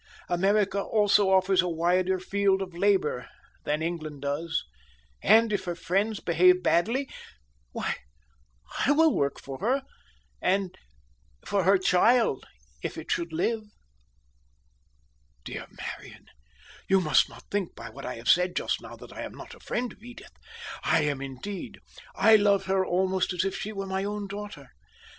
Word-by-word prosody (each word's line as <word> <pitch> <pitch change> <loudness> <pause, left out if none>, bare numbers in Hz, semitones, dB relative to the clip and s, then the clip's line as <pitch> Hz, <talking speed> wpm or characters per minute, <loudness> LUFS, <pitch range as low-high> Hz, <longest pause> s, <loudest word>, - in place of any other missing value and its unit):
America 195 +2 +2
also 205 -1 +3
offers 190 0 +4
a 180 - -2
wider 180 +3 +1
field 195 +1 +1
for 185 -3 -6
labor 180 -9 +1 0.4
than 150 +2 0
England 155 -4 -4
does, 160 +4 -2 0.6
and 225 +1 +5
if 200 - -1
her 175 -1 -3
friends 195 +5 0
behave 180 +2 +4
badly, 230 +11 +2 0.6
why - - -2 0.9
I 285 - +5
will 320 +1 +4
work 140 -1 0
for 135 -1 -8
her, 260 +6 +1 0.6
and 190 -1 0 0.7
for 195 -3 0
her 195 +1 +6
child 190 - +3 0.3
if - - -4
it - - -6
should 170 -1 -1
live." 220 +8 0 1.8
"Dear - - -6
Marian, - - -9 0.6
you 190 0 +5
must 155 -6 +3
not - - -14
think 200 -4 -2
by 115 - -9
what - - -10
I 115 - -6
said 180 +7 +3
just - - -1
now, - - -10
that - - -13
I - - -7
am - - -6
not - - -10
a - - -14
friend 245 -1 -3
of - - -24
Edith. 245 +2 -12 0.5
I 160 0 +3
am, 145 -2 -1
indeed. 140 +9 -6 0.4
I 220 0 +6
love 200 -2 +3
her 190 0 +2
almost 185 +1 0
as 180 - 0
if 195 - -2
she 215 - -4
were 195 -2 -4
my 190 0 -2
own 205 0 -3
daughter. 200 -9 -8
190 Hz, 155 wpm, -27 LUFS, 170-205 Hz, 1.8 s, her